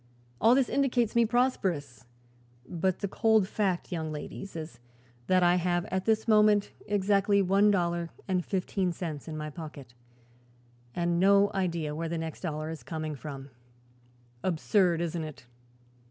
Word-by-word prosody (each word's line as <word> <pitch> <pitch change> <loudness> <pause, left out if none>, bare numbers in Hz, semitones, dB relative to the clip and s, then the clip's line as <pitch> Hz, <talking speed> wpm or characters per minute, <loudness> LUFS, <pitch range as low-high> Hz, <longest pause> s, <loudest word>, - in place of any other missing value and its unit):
All 230 +3 +6
this 270 -2 +3
indicates 245 -5 +1
me 235 -1 +4
prosperous, 180 - -1 0.6
but 175 +4 -1
the 200 - 0
cold 220 0 +3
fact, 190 -4 -1
young 160 -3 -3
ladies, 155 +5 -7
is 155 -6 -7 0.5
that 185 -1 +4
I 175 +1 +4
have 175 0 0
at 190 0 -1
this 220 0 +1
moment 210 -2 +4 0.2
exactly 200 0 +2
one 195 +2 +4
dollar 170 -3 0 0.2
and 185 -2 0
fifteen 185 -1 -1
cents 160 -4 -6
in 155 -1 -5
my 150 0 -5
pocket, 145 -6 -9 1.0
and 170 0 0
no 200 +2 +5
idea 170 -5 -1
where 165 +2 -3
the 170 - -2
next 160 -1 -5
dollar 155 -2 -3
is 160 - -7
coming 155 -1 -4
from. 140 -1 -8 0.9
Absurd, 180 0 +2
isn't 170 -1 -2
it? 150 -5 -9
175 Hz, 150 wpm, -29 LUFS, 160-200 Hz, 1.0 s, All